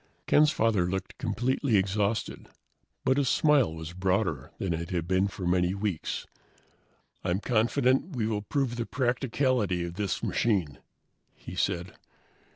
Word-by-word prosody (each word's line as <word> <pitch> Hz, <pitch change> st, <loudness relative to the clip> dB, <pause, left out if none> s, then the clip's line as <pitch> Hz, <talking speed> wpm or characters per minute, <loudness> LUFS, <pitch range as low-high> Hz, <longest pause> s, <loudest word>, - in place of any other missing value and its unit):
Ken's 150 Hz, +1 st, +5 dB
father 105 Hz, -9 st, +1 dB
looked 95 Hz, 0 st, -4 dB
completely 125 Hz, +1 st, +1 dB
exhausted, 100 Hz, +3 st, -1 dB, 0.6 s
but 130 Hz, +1 st, +3 dB
his 140 Hz, -3 st, +2 dB
smile 150 Hz, -, +4 dB
was 80 Hz, +1 st, -7 dB
broader 90 Hz, -6 st, 0 dB
than 95 Hz, -3 st, -1 dB
it 85 Hz, +1 st, -4 dB
had 85 Hz, -3 st, -2 dB
been 95 Hz, +2 st, +2 dB
for 95 Hz, -2 st, -6 dB
many 90 Hz, +1 st, +2 dB
weeks. 100 Hz, -5 st, -3 dB, 1.0 s
"I'm 90 Hz, +1 st, 0 dB
confident 125 Hz, -, +1 dB
we 115 Hz, -3 st, 0 dB
will 105 Hz, -2 st, -1 dB
prove 120 Hz, +3 st, -1 dB
the 115 Hz, -, -2 dB
practicability 125 Hz, -6 st, 0 dB
of 85 Hz, -, -6 dB
this 100 Hz, -2 st, -2 dB
machine," 90 Hz, -, 0 dB, 0.6 s
he -, -, -9 dB
said. 85 Hz, +2 st, -1 dB
100 Hz, 140 wpm, -28 LUFS, 90-120 Hz, 1.0 s, Ken's